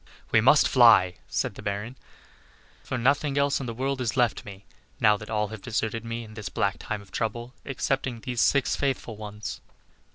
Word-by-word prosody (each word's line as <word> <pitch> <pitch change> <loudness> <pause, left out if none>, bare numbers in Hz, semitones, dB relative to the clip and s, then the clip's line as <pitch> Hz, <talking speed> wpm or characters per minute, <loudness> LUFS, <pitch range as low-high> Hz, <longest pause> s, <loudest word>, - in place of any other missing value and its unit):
"We 110 - +5
must 135 +6 +6
fly," 115 -8 +6
said - - -1
the - - -10
Baron; 105 +5 -4 0.9
"for 130 - -3
nothing 140 +3 +1
else 140 0 +2
in 130 - -5
the 115 - -4
world 135 +2 -2
is 120 0 -2
left 120 -2 +2
me, 100 -1 -11 0.3
now 105 -1 +5
that 105 +1 -9
all 105 -2 0
have 110 -2 -8
deserted 115 +1 -2
me 115 0 -4
in 110 -1 -12
this 105 -3 -6
black 100 0 0
time 105 -2 -5
of 95 - -20
trouble, 120 +3 -3
excepting 135 -3 -2
these 125 -1 -2
six 140 -2 +3
faithful 130 -5 -2
ones." 105 0 -7
115 Hz, 190 wpm, -26 LUFS, 105-130 Hz, 0.9 s, must